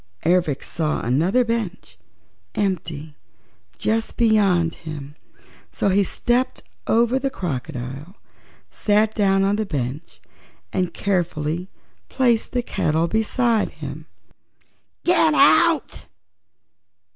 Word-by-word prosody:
Ervic 170 -5 +2
saw 155 -2 -2
another 165 - +2
bench, 230 -5 -4 0.6
empty, 160 -6 -2 0.6
just 225 +1 -1
beyond 195 -7 +3
him, 150 -3 -8 0.6
so - - 0
he 200 +1 +3
stepped 240 +6 -1 0.2
over 235 +3 +3
the 275 +1 -1
crocodile, 135 - -5 0.6
sat 215 +1 +2
down 195 -2 +2
upon 200 +1 +2
the 215 - -1
bench 140 -1 -4 0.5
and 180 -1 0
carefully 175 -2 -1 0.4
placed 240 -4 +1
the 245 -1 -1
kettle 160 -5 0
beside 220 +3 +1
him. - - -8 1.0
"Get 325 -3 +4
out!" 325 +3 +4
195 Hz, 100 wpm, -22 LUFS, 160-225 Hz, 1.0 s, Get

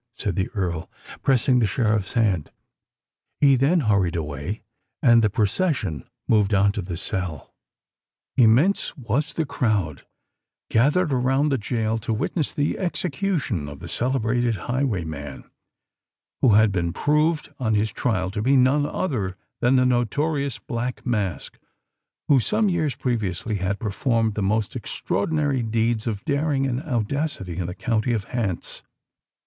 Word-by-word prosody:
said 100 -6 -2
the 95 +1 -1
Earl, 85 -5 -2 0.3
pressing 130 -1 +3
the 110 - +3
Sheriff's 110 -4 0
hand. 100 -9 +1 0.9
He 140 -2 +6
then 145 +7 +3
hurried 100 - +2
away; 80 - -4 0.4
and 120 -3 +5
the 105 - +3
procession 105 - -1 0.2
moved 105 -2 +3
on 100 +1 +4
to 105 - -3
the 90 -2 -5
cell. 90 -6 -4 0.8
Immense 130 - +3
was 135 +5 -1
the 160 - 0
crowd 105 - -1 0.7
gathered 145 +7 +3
around 135 +3 +2
the 135 -3 +1
gaol 110 0 -1
to 110 0 -2
witness 145 - -1
the 145 0 -1
execution 165 - -1
of 70 - -9
the - - -9
celebrated 120 -1 0
highwayman 85 - -3 1.0
who 115 -5 +5
had 110 -1 +5
been 85 -3 -1
proved 150 +1 +1
on 110 -4 +1
his 105 0 +1
trial 95 -7 -1
to 105 +1 -3
be 135 +5 +4
none 135 +3 +3
other 105 - -2 0.2
than 125 +2 +3
the 125 0 +4
notorious 140 +3 0
Black 120 +1 -4
Mask 105 -7 -2 0.7
who 140 -3 +5
some 210 - +1
years 155 -8 0
previously 110 -4 -2
had 95 +2 -1
performed 115 +1 0
the 105 - -3
most 105 +2 0
extraordinary 140 - -1
deeds 115 0 0
of 105 -3 -3
daring 140 -1 +1
and 130 -1 -1
audacity 125 - -2
in 90 - -2
the 90 - -5
county 115 +1 0
of 110 -3 -1
Hants. 105 -6 -3
115 Hz, 145 wpm, -24 LUFS, 100-135 Hz, 1.0 s, He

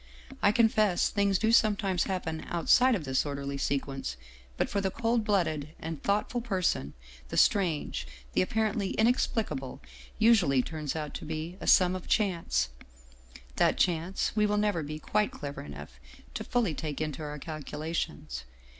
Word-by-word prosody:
I 205 - +5
confess 215 -4 +3
things 200 -2 +2
do 220 +3 +2
some 215 -2 +5
times 190 -4 0
happen 165 -4 -3
outside 245 +9 +4
of 180 - -3
this 130 -1 +1
orderly 140 -1 -4
sequence; 135 - -2 0.4
but - - +1
for 200 - -1
the 190 - 0
cold 230 +3 0
blooded 155 -7 0
and 160 -3 -5
thoughtful 210 +4 0
person 185 - -1 0.3
the - - -4
Strange, 165 - +2 0.3
the - - +3
ap 185 - -1
parently 215 -3 0
Inexplicable, 220 - 0 0.4
usually 190 - +4
turns 155 -1 -4
out 150 -2 -4
to - - -6
be 160 +3 -4
a - - -5
sum 185 0 +5
of 185 - -7
Chance, 170 - +1 0.9
that - - +3
Chance 175 +1 +1
we 210 -1 +3
will 210 0 +1
never 205 -5 +1
be 155 +1 -5
quite 210 +6 0
clever 145 -1 -7
enough 70 -3 -10 0.3
to - - -4
fully 235 -9 0
take 150 -2 -4
into 155 -1 -3
our 150 -1 -5
calculations. 150 - -4
170 Hz, 160 wpm, -29 LUFS, 150-210 Hz, 0.9 s, I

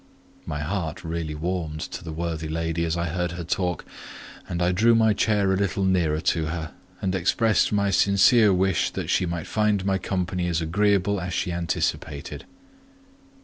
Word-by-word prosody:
My 75 - -3
heart 80 0 -3
really 80 -2 -4
warmed 80 -1 -3
to 90 - -6
the 80 - -6
worthy 80 -1 -3
lady 80 +1 -1
as 85 +1 -1
I 85 - -1
heard 90 +1 -2
her 85 0 -5
talk; 90 0 -2 0.6
and 85 - -2
I 90 0 +2
drew 115 +6 +4
my 110 -1 +4
chair 100 -2 +2
a - - +2
little 95 -1 0
nearer 85 -5 +2
to 80 -2 0
her, 80 -2 -4 0.3
and 95 -1 0
expressed 95 +3 +2
my 100 -1 +1
sincere 100 +3 +5
wish 95 0 +2
that - - -4
she 90 - +2
might 85 -2 -3
find 105 -3 +1
my 95 -1 +1
company 90 -1 -2
as 85 -2 0
agreeable 100 +3 +1
as 90 +1 -4
she 90 - -1
anticipated. 85 -4 -3
90 Hz, 175 wpm, -25 LUFS, 80-100 Hz, 0.6 s, sincere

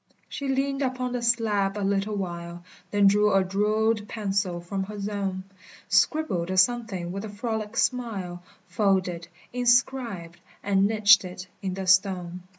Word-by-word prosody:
She 280 - -5
leaned 275 +1 0
upon 255 -1 -2
the 245 -1 -2
slab 215 -4 +1
a 205 - -1
little 200 +1 0
while, 175 -2 -5 0.3
Then 205 -1 +2
drew 210 +1 +4
a 195 -1 +4
jewelled 210 +3 0
pencil 195 -5 -2
from 190 +3 -4
her 210 +1 -8
zone, 200 -2 -3 0.5
Scribbled 205 - +1
a 185 - -2
something 195 -4 +1
with 195 +2 -5
a 220 - -6
frolic 220 +1 -4
smile, 200 -8 -1 0.2
Folded, 185 -5 0 0.3
inscribed, 240 -8 +1 0.2
and 195 -1 +3
niched 210 -2 +5
it 185 0 -8 0.2
in 190 -2 -3
the 190 0 -4
stone. 185 -2 +2
200 Hz, 150 wpm, -26 LUFS, 185-225 Hz, 0.5 s, niched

